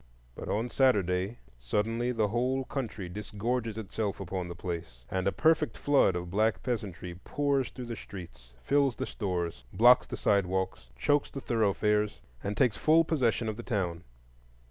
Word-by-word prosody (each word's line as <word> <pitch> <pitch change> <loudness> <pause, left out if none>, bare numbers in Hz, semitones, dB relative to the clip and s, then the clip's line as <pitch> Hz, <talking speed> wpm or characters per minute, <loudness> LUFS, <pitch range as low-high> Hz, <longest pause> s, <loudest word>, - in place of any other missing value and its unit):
But - - -7
on 110 +4 0
Saturday 100 -5 +2 0.2
suddenly 115 - 0
the 110 -4 +1
whole 130 +4 0
county 110 -9 -4
disgorges 110 +4 -3
itself 105 -1 -3
upon 95 -1 -3
the 85 - -6
place, 85 -8 -6
and 95 0 0
a - - +3
perfect 155 - +2
flood 140 -10 +3
of 90 0 -4
black 105 0 +1
peasantry 100 -8 -3
pours 140 -2 0
through 125 - -7
the 115 -1 -5
streets, 85 - -10
fills 140 -3 +3
the - - -3
stores, 90 - -3
blocks 125 +2 +6
the - - -5
sidewalks, 95 -9 0
chokes 145 - +2
the 135 - -6
thoroughfares, 105 -3 +1 0.2
and 100 +1 -3
takes 125 -7 +3
full 160 +1 +5
possession 125 -8 +1
of 110 -1 -3
the - - -5
town. 90 -8 -2
105 Hz, 160 wpm, -30 LUFS, 95-125 Hz, 0.2 s, blocks